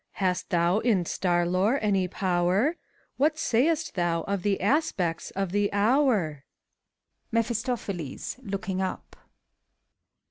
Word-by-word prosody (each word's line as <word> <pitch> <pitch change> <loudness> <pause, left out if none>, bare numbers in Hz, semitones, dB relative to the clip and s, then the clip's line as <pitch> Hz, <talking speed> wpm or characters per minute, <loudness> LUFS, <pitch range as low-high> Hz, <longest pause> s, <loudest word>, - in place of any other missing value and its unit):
Hast 185 -2 -1
thou 175 +3 +2
in 215 -7 +2
star 175 0 +1
lore 185 +9 +2
any 195 -4 +1
power 185 +6 +1
f 340 - -6 0.4
What 305 +3 +2
say'st 315 +5 +1
thou 170 -2 0
of 200 -1 -2
the 200 0 0
aspects 190 - 0
of 195 -2 -1
the 205 +1 +1
hourf 205 - +2 0.9
MEPHISTOPHELES 230 - -2
{looking 195 -3 -3
up). 190 -1 -4
195 Hz, 115 wpm, -27 LUFS, 180-230 Hz, 0.9 s, thou